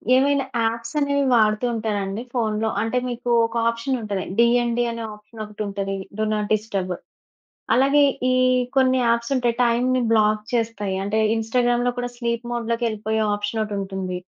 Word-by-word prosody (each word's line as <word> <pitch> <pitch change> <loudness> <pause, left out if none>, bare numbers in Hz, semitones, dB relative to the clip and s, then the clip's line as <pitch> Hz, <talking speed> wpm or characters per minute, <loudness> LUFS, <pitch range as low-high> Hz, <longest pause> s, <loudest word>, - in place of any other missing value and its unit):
ఏమైనా 275 +1 +3 0.2
ఆప్స్ 230 +5 -7
అనేవి 280 -1 +1
వాడుతూ 215 +1 +3
ఉంటారండి 210 -1 -2
ఫోన్‌లో. 220 -2 0
అంటే 225 +3 -1
మీకు, 245 0 -4 0.2
ఒక 230 - -12
ఆప్షన్ 235 +3 -2
ఉంటది. 200 -3 -3 0.2
డీఎన్‌డి 240 0 +3
అనే 230 0 -5
ఆప్షన్ 210 +1 -12
ఒకటుంటది. 200 -2 -4 0.2
Do 215 - +1
not 210 -1 -2
disturb. 200 -4 -2 0.8
అలాగే, 275 +4 +4 0.3
ఈ - - +3 0.4
కొన్ని 260 -1 +4
ఆప్స్ 235 +2 -1
ఉంటాయి 240 -2 +1
టైంని 250 +2 +2
బ్లాక్ 215 -1 +3
చేస్తాయి. 225 -4 -1
అంటే, 205 +2 0 0.2
ఇన్‌స్టా‌గ్రామ్‌లో 240 +2 +1
కూడా 245 0 -2
స్లీప్ 235 -1 -2
మోడ్ 235 -1 -3
లోకి 235 0 0
ఎళ్ళిపోయే 220 0 -2
ఆప్షన్ 205 +2 -3
ఒకటుంటుంది. 190 -3 -4
230 Hz, 145 wpm, -22 LUFS, 210-240 Hz, 0.8 s, అలాగే